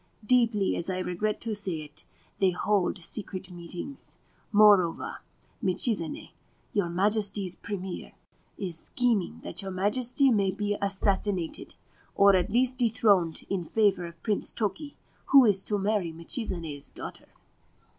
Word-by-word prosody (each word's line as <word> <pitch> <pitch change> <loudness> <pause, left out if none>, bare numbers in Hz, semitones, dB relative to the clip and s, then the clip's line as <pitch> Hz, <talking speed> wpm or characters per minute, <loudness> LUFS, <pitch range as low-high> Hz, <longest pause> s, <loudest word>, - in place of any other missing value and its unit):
Deeply 230 -4 +3
as 170 - -3
I 185 - -1
regret 185 +4 -2
to 230 -2 -1
say 190 -6 -2
it, 150 0 -10 0.3
they 190 - +4
hold 195 +2 0
secret 190 0 -5
meetings. 175 +10 -8 0.3
Moreover, 205 -5 +4 0.4
Michizane, 185 -2 0 0.4
your 200 -6 +1
Majesty's 200 0 +1
Premier, 190 -2 -6 0.4
is 185 -5 -4
scheming 235 -6 0
that - - -2
your 195 - -5
Majesty 240 +8 +2
may 200 -4 +2
be 205 +2 -1
assassinated, 195 -2 -1 0.4
or 200 0 +6
at 180 -2 +1
least 250 +3 +1
dethroned 205 -8 +2
in 195 -3 -2
favour 195 -1 +1
of 170 -1 -14
Prince 210 -2 -1
Toki, 285 +8 -3 0.3
who 275 -2 +7
is 195 -3 +3
to 210 - +1
marry 200 -3 0
Michizane's 165 - -4
daughter.' - - -7
200 Hz, 130 wpm, -28 LUFS, 180-215 Hz, 0.4 s, who